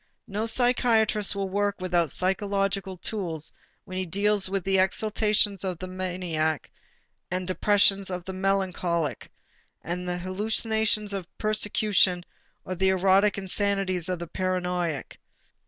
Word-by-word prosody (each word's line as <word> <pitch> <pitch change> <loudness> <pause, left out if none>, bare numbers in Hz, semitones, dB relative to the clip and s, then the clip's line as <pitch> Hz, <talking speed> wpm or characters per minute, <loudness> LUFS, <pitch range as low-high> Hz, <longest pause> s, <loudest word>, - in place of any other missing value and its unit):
No 210 +3 -2
psychiatrist 225 -3 +3
will 195 -1 -2
work 205 +1 0
without 175 -3 +1
psychological 195 - -1
tools 175 -5 -3 0.3
when 185 -2 -6
he 185 - -2
deals 200 +2 +2
with 195 -1 -1
the 195 0 +2
exultations 210 +1 +1
of 185 -3 -2
the 185 - -6
maniac 180 -4 -2 0.6
and 180 0 -3
the 185 - -1
depressions 200 -1 +4
of 180 -1 -5
the 190 - -5
melancholic, 185 - -1 0.6
with 180 +2 -3
the 180 0 -2
hallucinations 215 +3 0
of 190 -3 -4
persecution 210 -4 +2 0.4
or 185 - -3
the 190 +1 +2
erotic 190 +2 +3
insanities 190 -2 -1
of 180 - -1
the 170 - -6
paranoiac. 180 -4 -2
190 Hz, 130 wpm, -26 LUFS, 180-205 Hz, 0.6 s, depressions